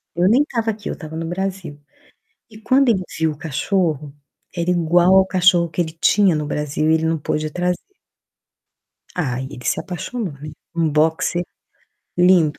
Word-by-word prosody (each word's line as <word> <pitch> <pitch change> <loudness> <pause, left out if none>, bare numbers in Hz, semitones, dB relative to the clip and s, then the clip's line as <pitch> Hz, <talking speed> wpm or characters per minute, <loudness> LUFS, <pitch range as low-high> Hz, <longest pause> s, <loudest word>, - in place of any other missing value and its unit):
Eu 175 +1 +3
nem 260 +6 +5
estava 230 -5 -2
aqui, 210 0 -7
estava 160 -1 -7
no 165 - -3
Brasil. 180 -3 -4 0.7
E 215 0 -13
quando 260 +4 +3
ele 200 -5 +2
viu 160 0 +1
o 145 - -13
cachorro, 155 -1 -1 0.4
era 170 0 -1
igual 175 +2 +4
ao 190 0 +6
cachorro 180 -2 +3
que 170 - -3
ele 160 -2 -1
tinha 185 +2 +3
no 150 -1 -2
Brasil 150 +1 -1
e - - +5
ele 160 0 +1
não 160 -1 0
pôde 155 +1 -2
trazer. 180 +2 -1 1.4
Aí 130 -6 -2
ele 125 -3 -10
se - - +1
apaixonou, 190 +1 -5
né, 145 +2 -9 0.2
um 165 -2 +1
boxer 160 +3 +1 0.7
lindo. 175 -4 +4
170 Hz, 165 wpm, -20 LUFS, 155-185 Hz, 1.4 s, ao